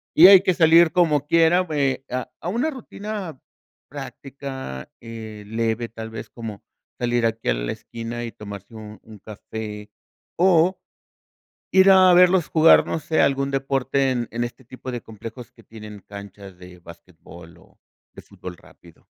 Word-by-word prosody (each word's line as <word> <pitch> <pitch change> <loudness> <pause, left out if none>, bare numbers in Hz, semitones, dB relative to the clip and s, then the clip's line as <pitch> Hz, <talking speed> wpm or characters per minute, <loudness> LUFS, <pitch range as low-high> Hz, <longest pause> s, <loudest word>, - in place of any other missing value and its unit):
Y 170 +4 +10
hay 195 -1 +10
que 185 -2 +1
salir 165 0 +5
como 150 -5 +2
quiera, 165 +2 +4
bueno, 145 -6 0
a 125 0 -4
a - - -7
una 235 - 0
rutina 210 - -7 0.5
práctica, 135 - -8
eh, 110 -2 -9
leve, 115 +1 -2
tal 110 0 -8
vez, 110 - -8
como, 110 -4 -8 0.4
salir 120 -1 +1
aquí 115 0 -2
a - - +4
la - - -3
esquina 115 +1 -7
y 115 - -6
tomarse 100 0 -10
un 105 -1 -10
un 110 -2 -14
café, 105 0 -8 0.5
o 180 0 +3 0.9
ir 190 +1 +6
a 185 -1 +7
verlos 180 -1 +5
jugar, 160 0 +5
no - - -2
sé, 155 +1 0
algún 140 0 +1
deporte 135 0 0
en, 120 -2 -2
en 120 +1 -2
este 120 +2 -7
tipo 130 +1 -8
de 120 -1 -5
complejos 115 +2 -10
que - - -20
tienen 105 -2 -11
canchas 100 -2 -11
de 90 0 -14
basquetbol, 85 -1 -15
o - - -24 0.3
de - - -12
fútbol 90 -1 -10
rápido. 85 0 -20
120 Hz, 160 wpm, -22 LUFS, 105-160 Hz, 0.9 s, Y